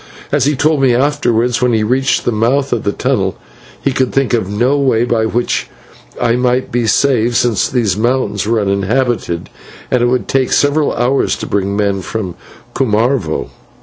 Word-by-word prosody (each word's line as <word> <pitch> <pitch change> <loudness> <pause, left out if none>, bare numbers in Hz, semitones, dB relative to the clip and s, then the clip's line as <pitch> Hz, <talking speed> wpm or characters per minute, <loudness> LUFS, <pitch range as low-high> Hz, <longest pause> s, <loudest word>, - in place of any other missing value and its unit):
As 145 -2 +2
he 145 +1 +1
told 150 +1 +1
me 130 -3 +3
afterwards, 125 -3 +1
when 125 -1 +2
he 110 -1 +1
reached 130 +4 +1
the - - +1
mouth 125 +5 +1
of - - -2
the 100 - +1
tunnel, 100 -6 -1 0.4
he 140 - -1
could 130 -1 0
think 135 -2 0
of 110 -5 0
no 120 +7 +1
way 130 -5 +2
by 115 -2 0
which 120 +2 -1 0.5
I - - +1
might 125 +1 0
be 120 -1 0
saved, 120 0 +2
since 115 -6 +1
these 120 -6 0
mountains 115 -2 -1
were 115 0 +1
uninhabited, 100 -1 -1 0.4
and 125 - +2
it 120 - +3
would 125 +1 0
take 135 -1 0
several 145 +1 +2
hours 125 +3 +1
to - - -6
bring 100 0 -1
men 100 -2 0
from 95 -3 -4 0.4
Cumarvo. 115 - 0
120 Hz, 180 wpm, -15 LUFS, 110-130 Hz, 0.5 s, me